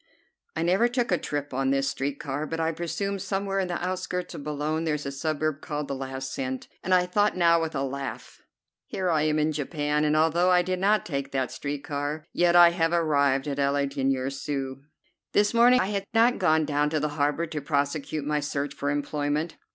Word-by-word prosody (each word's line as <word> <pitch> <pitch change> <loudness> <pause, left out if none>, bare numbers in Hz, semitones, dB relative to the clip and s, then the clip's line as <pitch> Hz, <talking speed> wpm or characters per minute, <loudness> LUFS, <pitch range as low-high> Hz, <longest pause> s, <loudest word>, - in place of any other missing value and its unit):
I 160 - -1
never 185 +7 +3
took 245 -2 -1
a 180 - +4
trip 145 -1 -4
on 135 +1 0
this 135 0 +1
street 140 0 -2
car, 145 +2 -3
but 165 +1 -4
I 160 0 +1
presume 175 +5 -3
somewhere 195 +1 -2
in 190 - 0
the 175 0 -2
outskirts 180 -1 -3
of - - -7
Boulogne 150 +2 -2
there 160 -2 0
is 150 - -6
a 140 - -3
suburb 155 +1 -2
named 150 -1 -2
"The - - -3
Last 135 0 -5
Cent," 130 -1 -4
and 185 - -4
I 180 -1 +5
thought 205 +2 +1
now 170 -1 +4
with 160 -1 -3
a 135 - 0
laugh: 140 0 -6 0.5
"Here 185 -2 -1
I 155 -2 +2
am 155 0 +1
in 155 +1 +2
Japan, 150 0 -1
and 150 0 +2
although 165 +3 +3
I 180 -1 +5
did 185 0 -2
not 205 +1 +2
take 140 -3 -3
that 130 -2 -1
street 145 -1 -4
car, 145 +2 -3
yet 175 0 +3
I 175 -1 +8
have 165 -1 0
arrived 140 -5 +2
at 140 -1 -3
'Le 140 0 +2
Dernier 135 -1 -1
Sou.'" 135 -1 -4 0.5
This 205 +2 +3
morning 245 +2 +6
I 195 - 0
had 200 -1 -2
not 235 +2 +4
gone 160 -4 +3
down 150 0 +1
to 155 0 0
the 150 +1 -1
harbor 150 +3 0
to 155 -2 -5
prosecute 145 +1 -1
my 150 0 0
search 145 -1 -3
for 145 0 -3
employment. 145 +2 -1
150 Hz, 215 wpm, -26 LUFS, 140-175 Hz, 0.5 s, I